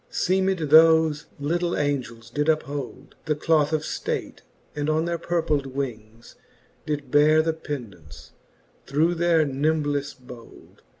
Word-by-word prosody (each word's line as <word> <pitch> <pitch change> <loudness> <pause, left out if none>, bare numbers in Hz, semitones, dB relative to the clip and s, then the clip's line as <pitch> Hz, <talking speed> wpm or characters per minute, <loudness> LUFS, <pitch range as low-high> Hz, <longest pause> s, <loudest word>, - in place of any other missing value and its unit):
XXIX. - - -15
Seemed 190 +1 +1
thofe 160 -1 +5
litle 170 +4 -1
Angels 120 -6 -3
did 150 +4 0
uphold 145 -4 -3
The 155 -1 0
cloth 150 0 +2
of 155 -1 0
flate, - - -4 0.3
and 145 0 -2
on 155 +1 +1
their 170 -1 -2
purpled 155 -5 -1
wings 115 -4 -7 0.5
Did 150 -1 -4
beare 155 +2 +5
the 160 0 0
pendants, 115 - -9 0.6
through 155 +5 +2
their 170 -2 +2
nimbleile 145 -1 -1
bold. 120 -2 -14
150 Hz, 130 wpm, -24 LUFS, 140-160 Hz, 0.6 s, thofe